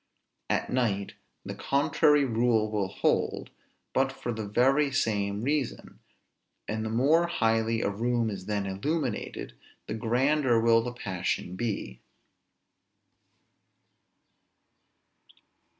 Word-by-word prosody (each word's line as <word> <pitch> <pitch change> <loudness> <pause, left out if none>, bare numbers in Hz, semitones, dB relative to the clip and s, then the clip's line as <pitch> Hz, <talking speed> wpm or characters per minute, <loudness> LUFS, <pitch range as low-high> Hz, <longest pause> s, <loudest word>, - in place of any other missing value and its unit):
At - - 0
night 105 -6 0 0.3
the - - -5
contrary 145 0 +2
rule 115 -3 +1
will 105 -3 0
hold, - - -1 0.4
but 135 0 +2
for 130 -2 -5
the 110 -2 -5
very 135 +7 +3
same 105 -5 0
reason; 145 -2 -2 0.7
and 110 0 -2
the 110 - -3
more 145 +9 +3
highly 115 -6 +1
a - - +1
room 115 +1 0
is 95 -1 -7
then 105 -1 -1
illuminated, 125 +6 -3 0.3
the - - -4
grander 125 +3 +2
will 115 0 +4
the 120 +1 -4
passion 95 -5 -3
be. 100 - -4
115 Hz, 105 wpm, -28 LUFS, 105-135 Hz, 0.7 s, will